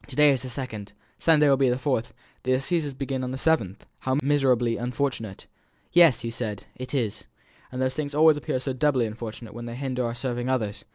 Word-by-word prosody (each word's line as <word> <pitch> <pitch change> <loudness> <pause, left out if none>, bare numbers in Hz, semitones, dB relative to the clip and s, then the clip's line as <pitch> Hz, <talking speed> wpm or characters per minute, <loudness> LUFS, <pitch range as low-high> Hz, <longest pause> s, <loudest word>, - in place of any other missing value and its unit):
"To 140 - -9
day 150 0 +6
is 130 -3 +1
the 130 - -4
second 110 -6 -5 0.3
Sunday 155 -2 +5
will 135 -1 +5
be 135 -1 +3
the 125 - +1
fourth 130 -3 -1 0.3
the 130 - +1
assizes 145 +1 -1
begin 135 -1 -3
on 125 - -2
the 130 - -4
seventh; 120 - 0
how 130 +1 0
miserably 130 -5 +2
unfortunate!" 120 -4 -3 0.5
"Yes!" 170 -8 +6
he 115 - -4
said, 110 -3 -4
"it 130 +2 -6
is. 115 -5 -2 0.5
And 125 - -5
these 130 0 0
things 145 -1 -4
always 155 0 +6
appear 135 -3 -2
so 130 +1 -3
doubly 130 -2 +2
unfortunate 110 0 -7
when 120 +1 -7
they 120 - -6
hinder 130 -1 -2
our 115 0 -2
serving 120 0 -3
others! 105 -5 -2
130 Hz, 210 wpm, -26 LUFS, 115-140 Hz, 0.5 s, day